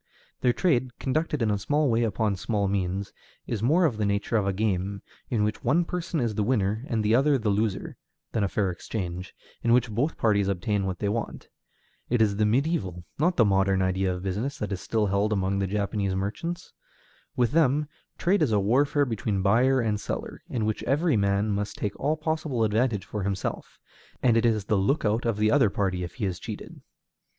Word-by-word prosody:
Their 125 - +3
trade, 125 -2 0
conducted 150 -1 -1
in 110 - +2
a 100 - 0
small 145 +8 +1
way 115 -2 +2
upon 110 -2 0
small 100 +1 -1
means, 95 0 -2 0.3
is 110 -4 -3
more 160 +10 +4
of 125 -9 0
the 110 - -1
nature 100 +3 -1
of 105 -3 +2
a - - +2
game, 100 -1 -1 0.3
in 110 -4 +1
which 105 +1 -2
one 160 +8 +2
person 170 -2 -3
is 120 -4 0
the 105 - -1
winner 105 -1 0
and 110 -3 0
the 110 - +3
other 140 +3 +4
the 110 -4 0
loser, 105 0 -1 0.3
than 110 - 0
a - - +2
fair 95 -1 0
exchange, 90 0 -5 0.3
in 115 - +3
which 120 -2 +3
both 130 +9 -1
parties 100 -3 +2
obtain 100 +1 0
what 95 -1 -3
they 105 - -2
want. 110 +2 -3 0.6
It 120 - +2
is 105 -3 +2
the 105 - +3
mediæval, 105 - 0 0.2
not 175 +4 +2
the 115 - +6
modern 95 -1 +2
idea 95 0 +1
of 90 0 -5
business, 105 +9 -2
that 105 -1 -4
is 95 - -3
still 110 -2 0
held 100 +2 +1
among 100 -1 0
Japanese 100 -1 -1
merchants. 165 - -4 0.6
With 120 -2 +2
them, 150 -1 +3 0.3
trade 195 +2 +2
is 145 -7 +2
a 105 - +3
warfare 140 +8 +2
between 105 -5 -2
buyer 125 +6 +4
and 105 -2 0
seller, - - -5
in 115 -4 -1
which 110 -1 -1
every 150 +3 +2
man 100 +1 +1
must 100 +1 -2
take 105 -1 -3
all 150 +3 0
possible 155 -6 -1
advantage 110 -2 +1
for 105 +2 -4
himself, 95 -1 -3 0.5
and 120 -3 +4
it 115 +1 +3
is 110 -4 +1
the 105 - +1
lookout 110 +1 +1
of 115 -3 0
the 110 +1 +2
other 110 - +4
party 95 -2 -1
if 90 0 -7
he 115 - -2
is 90 -3 -3
cheated. - - -8
110 Hz, 205 wpm, -26 LUFS, 100-125 Hz, 0.6 s, the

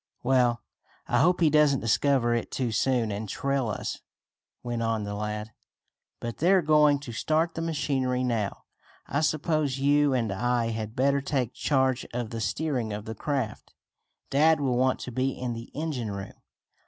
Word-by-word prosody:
"Well, 120 -3 +2 0.4
I 120 - +2
hope 180 +5 +3
he 160 -3 +5
doesn't 150 -3 +4
discover 120 +1 +2
it 120 - -1
too 125 -3 -2
soon 120 0 +1
and 105 +1 -4
trail 140 +2 -1
us," 105 - -4 0.6
went 120 -1 -3
on 115 -2 0
the 100 0 -4
lad. 105 +1 -4 0.7
"But 120 -1 -5
they're 185 +2 +4
going 150 -1 +5
to 125 - -7
start 155 +8 0
the 165 - -4
machinery 135 -6 0
now. 115 -5 -2 0.4
I 145 - -1
suppose 155 -2 0
you 145 +1 +3
and 115 -5 0
I 120 +3 0
had 110 0 -5
better 140 +2 +2
take 130 -4 -1
charge 130 -3 +1
of 120 -3 -3
the 115 -1 -4
steering 130 -6 -1
of 105 +1 -5
the 110 - -5
craft. 125 -1 -3 0.6
Dad 155 +3 +4
will 135 -3 0
want 130 +1 +2
to 125 - -6
be 130 +2 -1
in 125 -1 -2
the 115 0 -8
engine 145 -7 -3
room." 100 -1 -6
130 Hz, 170 wpm, -27 LUFS, 115-145 Hz, 0.7 s, he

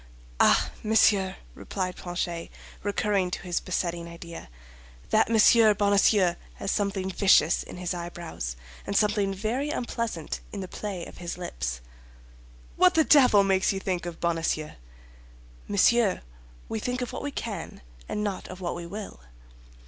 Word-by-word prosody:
"Ah, - - +4
monsieur!" 205 -3 +3 0.2
replied 185 -2 -4
Planchet, 175 -1 -4 0.3
recurring 200 -2 0
to - - -4
his 175 -2 -1
besetting 170 -1 -3
idea, 170 - -9 0.6
"that 220 - +4
Monsieur 220 -1 +6
Bonacieux 200 -2 +4 0.2
has 195 - -3
something 195 -2 -1
vicious 190 -5 +4
in - - -9
his 180 0 -2
eyebrows, 170 - -5 0.3
and 200 - -2
something 205 -2 +2
very 225 +9 -2
unpleasant 230 - -3
in 205 - -6
the 185 - -5
play 190 -3 -5
of - - -12
his 175 0 -5
lips." - - -4 1.0
"What 180 - +5
the 320 - +5
devil 250 -10 +6
makes 190 -1 +2
you 195 - -3
think 180 -2 -2
of 170 -1 -7
Bonacieux?" 165 -2 -1 1.0
"Monsieur, 205 +1 +3 0.4
we 220 - -3
think 250 +3 -2
of 245 - -6
what - - -4
we 290 - -3
can, 210 -10 -6 0.3
and 210 - -2
not 200 -3 -3
of 185 - -9
what 175 -2 -3
we 170 0 -6
will." 200 - -7
190 Hz, 150 wpm, -27 LUFS, 175-210 Hz, 1.0 s, Monsieur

